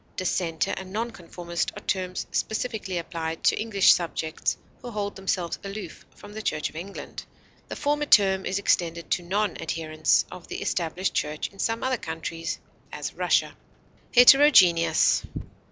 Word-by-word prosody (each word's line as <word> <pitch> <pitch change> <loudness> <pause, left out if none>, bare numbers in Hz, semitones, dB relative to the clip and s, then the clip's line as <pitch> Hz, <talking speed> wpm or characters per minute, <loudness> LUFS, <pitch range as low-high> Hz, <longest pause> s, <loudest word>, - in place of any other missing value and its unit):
Dissenter 170 -3 -1
and 190 -1 -7
non 230 +4 -2
conformist 170 -3 -4
are - - -8
terms 185 -1 -2
specifically 220 -5 -2
applied 165 -1 -4
to - - +3
English 205 -4 +5
subjects 165 -2 -2 0.2
who 245 - -7
hold 205 -3 -3
themselves 190 -3 -2
aloof 200 +1 -8
from 205 0 -13
the 220 - -5
Church 155 -7 -2
of - - -22
England; 185 +5 -7 0.4
the - - -6
former 295 0 0
term 190 -4 +5
is 190 - -1
extended 170 -4 0
to - - +2
non 200 +4 -1
adherents 155 -1 +1
of 180 -1 -10
the - - -5
established 180 +2 -1
church 150 0 -2
in 195 - -20
some 225 0 -1
other 260 -1 +1
countries, 165 -1 -5 0.3
as - - -5
Russia. - - +1 0.6
HETEROGENEOUS. 195 - +6
185 Hz, 150 wpm, -26 LUFS, 170-210 Hz, 0.6 s, HETEROGENEOUS